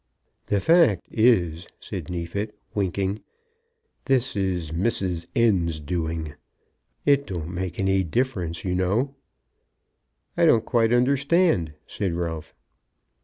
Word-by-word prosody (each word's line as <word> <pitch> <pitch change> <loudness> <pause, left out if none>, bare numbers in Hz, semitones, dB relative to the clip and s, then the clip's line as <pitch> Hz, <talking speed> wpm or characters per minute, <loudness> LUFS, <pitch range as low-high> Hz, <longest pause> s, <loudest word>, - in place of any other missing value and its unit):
"The 100 - +1
fact 165 - +4
is," 90 -8 +2
said - - -6
Neefit 90 +5 -4 0.2
winking, 100 +1 -1 0.8
"this 135 -1 +1
is 90 -5 -1
Mrs. 90 -2 -1
N.'s 90 -9 +2
doing. 80 -1 -3 0.7
It 140 0 +3
don't 85 -2 -5
make 90 -1 -4
any 95 0 +2
difference, 90 -4 -2
you 90 - 0
know." 100 +10 0 1.2
"I - - +4
don't 115 -1 +4
quite 115 -3 +2
understand," 140 - +2
said 95 -4 -3
Ralph. 85 -2 -4
95 Hz, 110 wpm, -24 LUFS, 85-115 Hz, 1.2 s, fact